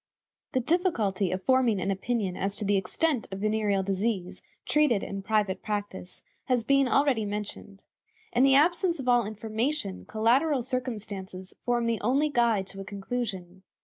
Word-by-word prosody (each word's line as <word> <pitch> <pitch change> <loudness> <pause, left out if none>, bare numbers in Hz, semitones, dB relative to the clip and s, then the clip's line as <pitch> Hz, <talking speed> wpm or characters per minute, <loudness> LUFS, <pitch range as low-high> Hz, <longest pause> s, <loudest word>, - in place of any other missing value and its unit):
The 260 - +2
difficulty 235 - +1
of 185 +1 -3
forming 255 -6 +3
an 190 +2 -1
opinion 195 -1 -1
as 195 +1 -2
to 210 - -3
the 205 +1 +2
extent 235 - 0
of 190 - -4
venereal 210 -1 +1
disease 190 -1 -2 0.2
treated 295 -9 +2
in 195 0 -5
private 205 -2 0
practice 205 -3 -5 0.2
has 250 -3 +1
been 275 +2 +3
already 270 -4 +2
mentioned. 205 -1 -6 0.5
In 240 - +3
the 270 0 +6
absence 340 +3 +3
of 260 - -5
all 240 -3 +4
information, 220 0 -3
collateral 250 +6 +2
circumstances 210 -7 -5
form 240 -1 +1
the 230 -2 0
only 275 +7 +2
guide 235 -7 +2
to 195 - -9
a - - -5
conclusion. 195 -3 -5
220 Hz, 155 wpm, -28 LUFS, 195-255 Hz, 0.5 s, the